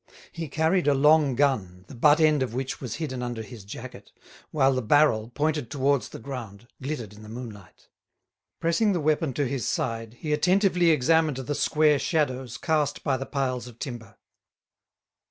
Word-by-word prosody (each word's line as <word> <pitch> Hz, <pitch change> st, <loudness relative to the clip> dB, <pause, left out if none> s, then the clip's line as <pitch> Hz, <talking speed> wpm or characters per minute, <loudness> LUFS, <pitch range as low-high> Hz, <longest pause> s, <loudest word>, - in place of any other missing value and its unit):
He 165 Hz, -1 st, -5 dB
carried 160 Hz, +4 st, +1 dB
a 145 Hz, -, +4 dB
long 150 Hz, -1 st, +4 dB
gun, 100 Hz, -10 st, 0 dB
the -, -, -11 dB
butt 145 Hz, +5 st, +4 dB
end 155 Hz, -3 st, +4 dB
of 125 Hz, -3 st, -2 dB
which 130 Hz, +1 st, -4 dB
was 125 Hz, -5 st, -4 dB
hidden 130 Hz, -6 st, -4 dB
under 120 Hz, -2 st, -4 dB
his 110 Hz, -2 st, -11 dB
jacket, 100 Hz, -, -10 dB, 0.4 s
while 135 Hz, -3 st, +3 dB
the 130 Hz, -, -1 dB
barrel, 115 Hz, -3 st, +3 dB
pointed 150 Hz, -1 st, -1 dB
towards 140 Hz, -1 st, 0 dB
the -, -, -9 dB
ground, 120 Hz, -4 st, -8 dB
glittered 130 Hz, -7 st, -5 dB
in 105 Hz, -, -14 dB
the 105 Hz, -, -11 dB
moonlight. 110 Hz, -5 st, -10 dB, 0.7 s
Pressing 175 Hz, +6 st, +2 dB
the 175 Hz, -, 0 dB
weapon 155 Hz, -1 st, +1 dB
to 145 Hz, -, 0 dB
his 130 Hz, -1 st, -2 dB
side, 115 Hz, -6 st, -3 dB
he 150 Hz, +4 st, -3 dB
attentively 180 Hz, +2 st, +3 dB
examined 155 Hz, -1 st, +3 dB
the 135 Hz, +2 st, -3 dB
square 150 Hz, 0 st, +3 dB
shadows 130 Hz, -7 st, -1 dB
cast 150 Hz, -3 st, 0 dB
by 140 Hz, -3 st, +1 dB
the 135 Hz, +1 st, -5 dB
piles 130 Hz, -3 st, -2 dB
of 120 Hz, -2 st, -13 dB
timber. 120 Hz, -3 st, -7 dB
135 Hz, 170 wpm, -26 LUFS, 120-155 Hz, 0.7 s, a